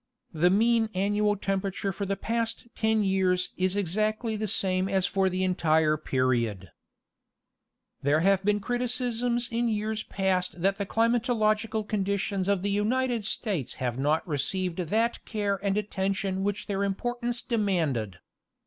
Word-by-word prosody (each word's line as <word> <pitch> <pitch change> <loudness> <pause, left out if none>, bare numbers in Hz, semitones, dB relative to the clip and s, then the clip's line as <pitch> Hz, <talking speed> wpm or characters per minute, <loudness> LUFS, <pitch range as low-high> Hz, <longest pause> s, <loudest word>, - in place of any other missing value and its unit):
The 170 +3 +3
mean 225 +3 +3
annual 205 +2 +2
temperature 195 0 -2
for 200 +2 -4
the 195 0 -1
past 230 +3 -2
ten 220 -1 +1
years 185 -2 +1
is 185 +1 0
exactly 215 +4 0
the 215 0 -2
same 185 -1 +1
as 190 -1 +2
for 190 +1 +1
the 185 +1 -1
entire 160 -4 +2
period. 120 -9 -1 1.3
There 145 +3 +2
have 195 +1 +3
been 210 +1 +2
criticisms 245 0 -1
in 235 +1 +1
years 215 0 -1
past 185 -4 -1
that 195 +1 +2
the 200 - -2
climatological 225 -2 +1
conditions 200 -1 -1
of 200 -2 +1
the 200 - 0
United 230 +2 0
States 190 - -2
have 125 -1 -3
not 150 +6 +1
received 175 +4 -1
that 220 +7 0
care 205 -3 -1
and 200 0 +1
attention 195 -1 -1
which 205 0 -2
their 200 -1 -1
importance 240 +4 -2
demanded. 165 - 0
200 Hz, 140 wpm, -27 LUFS, 185-220 Hz, 1.3 s, The